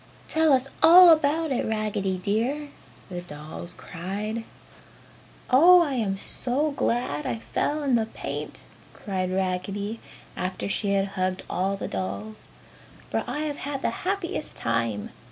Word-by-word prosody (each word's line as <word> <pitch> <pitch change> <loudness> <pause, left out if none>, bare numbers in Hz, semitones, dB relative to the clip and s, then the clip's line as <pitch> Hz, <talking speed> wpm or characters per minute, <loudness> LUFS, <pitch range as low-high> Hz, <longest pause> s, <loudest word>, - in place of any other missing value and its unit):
"Tell 315 -1 +3
us 260 0 +3
all 350 +1 +10
about 315 0 +2
it, 260 - 0
Raggedy 210 -3 -1
dear!" 235 +10 -1 0.4
the 180 -1 -5
dolls 155 0 -8
cried. 205 +6 -5 1.1
"Oh 345 +7 +8
I 290 -4 -2
am 210 -6 -1
so 270 +9 0
glad 235 - -1
I 120 - -1
fell 290 - -2
in 275 -3 +1
the 225 -2 +2
paint!" - - -5 0.3
cried 185 -3 -3
Raggedy, 195 +3 -2 0.4
after 185 +1 -3
she 200 0 0
had 195 0 +1
hugged 185 -1 -2
all 195 +2 -1
the - - -4
dolls, 100 +3 -5 0.6
"For 110 - 0
I 295 - -3
have 300 -2 -3
had 275 -1 -4
the - - +1
happiest 370 -4 -3
time. 115 -3 -1
205 Hz, 140 wpm, -26 LUFS, 185-285 Hz, 1.1 s, all